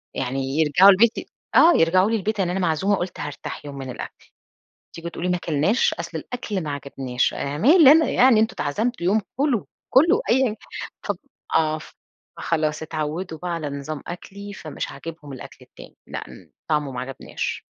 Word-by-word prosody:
يعني 135 +3 -2
يرجعوا 160 +6 +6
البيت 215 +4 +5
ي - - -4 0.3
آه، 345 - +8
يرجعوا 185 +5 +4
لي 230 - +1
البيت، 215 0 -2
يعني 180 -2 +1
أنا 190 - -1
معزومة 180 +4 +1
قلت 175 0 -5
هارتاح 145 0 -6
يوم 140 -1 -7
من 135 -1 -6
الأكل، - - -9 0.7
تيجوا 170 0 -7
تقولوا 180 +1 -3
ما 180 - +2
اكلناش! 170 - +1
أصل - - -5
الأكل 215 -7 -4
ما 150 - -4
عجبناش، 135 -3 -2
أنا 145 +1 -3
مالي 290 - +8
أنا 320 0 +4
يعني، 245 -3 +5
أنتم 220 - +1
أتعزمتوا 210 +5 -1
يوم 215 +3 +3 0.2
كلوا، 270 -6 +1 0.3
كلوا، 340 - +5
أيًا 265 0 +4
كان 220 -3 -1 0.5
ف 205 -4 -3 0.4
آه، 155 -1 +2 0.6
فخلاص 155 -1 -1
اتعودوا 160 +2 -4
بقى 180 +2 -4
على 160 -4 -3
نظام 140 +1 -5
أكلي، 200 +3 -8
فمش 155 -6 -6
عاجبهم 150 0 -9
الأكل 130 - -10
التاني، - - -15
لأ، - - -6
امم، - - -15 0.2
طعمه 150 -3 0
ما 125 - -4
عجبناش. 130 0 -5
170 Hz, 175 wpm, -23 LUFS, 150-210 Hz, 0.7 s, آه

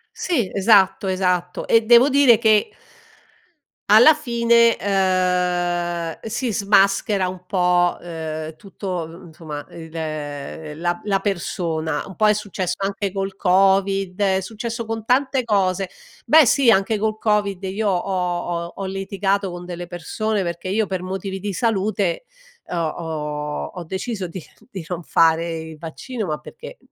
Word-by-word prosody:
Sì, 245 - -1
esatto, 195 -1 +4
esatto. 180 -1 -1
E 230 - +5
devo 240 +4 +7
dire 275 -4 +6
che 215 -3 +4 1.2
alla 235 +9 +8
fine, 235 -5 +3
ehm, 180 -3 0
si 225 +1 -3
smaschera 200 -1 +2
un 180 0 -8
po', 180 -2 +2
uhm, 160 -2 -6
tutto 195 +3 -10 0.2
uhm, 170 +3 -12
insomma 155 -3 -8
il 160 -1 -10
uhm, 150 -1 -6
la 175 +1 -1
la 195 -2 +1
persona, 165 -5 -2
un 190 - -11
po' 215 - +3
è 210 - +5
successo 195 -3 -3
anche 195 0 -2
col 195 0 -3
covid, 195 0 +2
è 190 -1 +2
successo 230 +3 -5
con 225 -1 -5
tante 260 +1 +2
cose. 195 -4 0 0.3
Beh 315 -1 +6
sì, 265 +1 +4
anche 210 0 +3
col 215 0 -1
covid, 205 -3 0
io 200 +3 -1
ho 190 +1 -1 0.5
ho - - -14
ho 195 - -5
litigato 195 +1 -1
con 175 0 -8
delle 175 0 -6
persone 195 +5 -2
perché, 170 +1 -5
io 210 +3 +1
per 190 -2 -4
motivi 190 +1 -5
di 205 +2 -4
salute, 200 - -1 0.4
uhm, 175 - -4
ho 165 -2 0
ho 150 -3 -4
ho 180 - -6
deciso 190 +2 -4
di 175 +2 -7 0.3
di 190 -8 -7
non 175 -2 -4
fare 165 0 +2
il 160 -1 -10
vaccino 210 - -6
ma 155 -1 -2
perché, - - -11
190 Hz, 150 wpm, -21 LUFS, 175-210 Hz, 1.2 s, alla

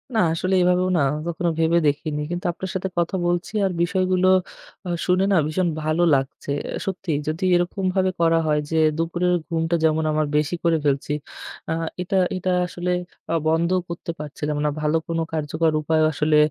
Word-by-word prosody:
না - - +3
আসলে 185 +3 -1
এভাবেও 180 +1 +3
না - - +2 0.3
কখনো 170 +1 -1
ভেবে 165 +1 +3
দেখিনি। 150 +1 -1
কিন্তু 175 0 -4
আপনার 185 +2 -6
সাথে 190 0 -1
কথা 170 +2 0
বলছি 175 +3 -1
আর 190 - +1
বিষয়গুলো 185 +1 +2 0.6
আ - - -3 0.2
শুনে 185 +1 +3
না 195 - +4
ভীষণ 175 +4 0 0.2
ভালো 155 +3 +1
লাগছে। 135 +1 -3
অ্যা - - -5
সত্যিই 180 -6 -2
যদি 155 +3 -2
এরকম 175 +3 -1
ভাবে 190 -1 +2
করা 165 0 +4
হয় 150 -1 +2
যে 160 - +1 0.2
দুপুরের 175 +2 0 0.2
ঘুমটা 165 0 0
যেমন 160 0 +3
আমার 155 0 +1
বেশি 150 +3 0
করে 165 -1 +3
ফেলছি 140 +1 0 0.6
আ - - +1 0.3
এটা 185 +2 -1 0.2
এটা 185 0 -1 0.2
আসলে 180 +1 -3 0.4
আ - - +1
বন্ধও 170 +3 +2
করতে 170 0 -5
পারছিলাম 150 0 -4
না - - +3
ভালো 150 +1 +2
কোনো 165 0 -1
কার্যকর 155 +1 0
উপায় 155 +1 +1
আসলে 150 0 +2
165 Hz, 180 wpm, -23 LUFS, 155-180 Hz, 0.6 s, না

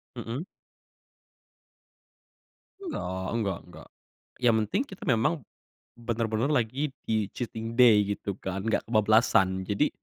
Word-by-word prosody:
Mhm. 120 +4 -4 2.4
Enggak, 95 - -4
nggak 100 -5 -1
nggak. - - -13 0.5
Yang 120 -2 +5
penting 110 - 0
kita 195 - -11
memang, 120 +6 +3 0.6
benar-benar 115 +1 -1
lagi 135 +3 0
di 110 -2 +1
cheating 115 -1 -5
day 105 -5 +5
gitu 100 -1 -5
kan, 95 +1 -4
nggak 110 - 0
kebablasan, 105 -4 +3
jadi 105 +10 +1
110 Hz, 110 wpm, -28 LUFS, 100-120 Hz, 2.4 s, Yang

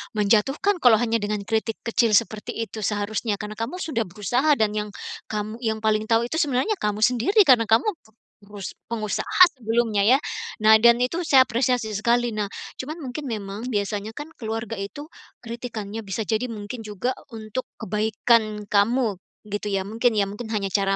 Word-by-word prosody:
menjatuhkan 235 - +2
kalau 245 -3 +6
hanya 230 0 +1
dengan 205 0 -2
kritik 220 +1 -1
kecil 230 -2 +2
seperti 215 -1 0
itu 225 -1 -4
seharusnya. 210 +1 -1
Karena 210 +1 -7
kamu 230 +10 -3
sudah 230 - -2
berusaha 245 - +1
dan 215 -3 +1
yang 210 0 -3 0.4
kamu 215 +2 -4
yang 220 -2 -2
paling 215 0 +2
tahu 230 0 +3
itu 320 - -1
sebenarnya 295 - +1
kamu 210 +1 -1
sendiri, 250 - +4
karena 245 -7 +5
kamu 225 +3 +4 0.6
perus 205 -1 -8 0.2
pengusaha 220 - -1 0.2
sebelumnya 225 -2 +1 0.2
ya. - - +4 0.5
Nah 220 0 +8
dan 235 +1 +5
itu 330 +8 -1
saya 265 -2 +7
apresiasi 245 -2 0
sekali, 235 +3 +1
nah 210 -1 -2 0.3
cuman 300 +5 -5
mungkin 270 +2 -5
memang 210 +1 -5
biasanya 210 -1 -2
kan 295 +2 -7
keluarga 225 -1 -4
itu 290 +11 -7 0.3
kritikannya, 225 -2 -6
bisa 215 +3 -2
jadi 225 +3 -1
mungkin 220 +1 -7
juga 210 +5 -2 0.2
untuk 220 +3 -5
kebaikan 215 +1 +1
kamu 210 -1 +2 0.3
gitu 205 0 -3
ya, 195 -1 0
mungkin 225 +3 0
ya, 205 - +3
mungkin 205 +4 -6
hanya 195 -2 -2
cara 195 0 +2
220 Hz, 165 wpm, -24 LUFS, 210-245 Hz, 0.6 s, Nah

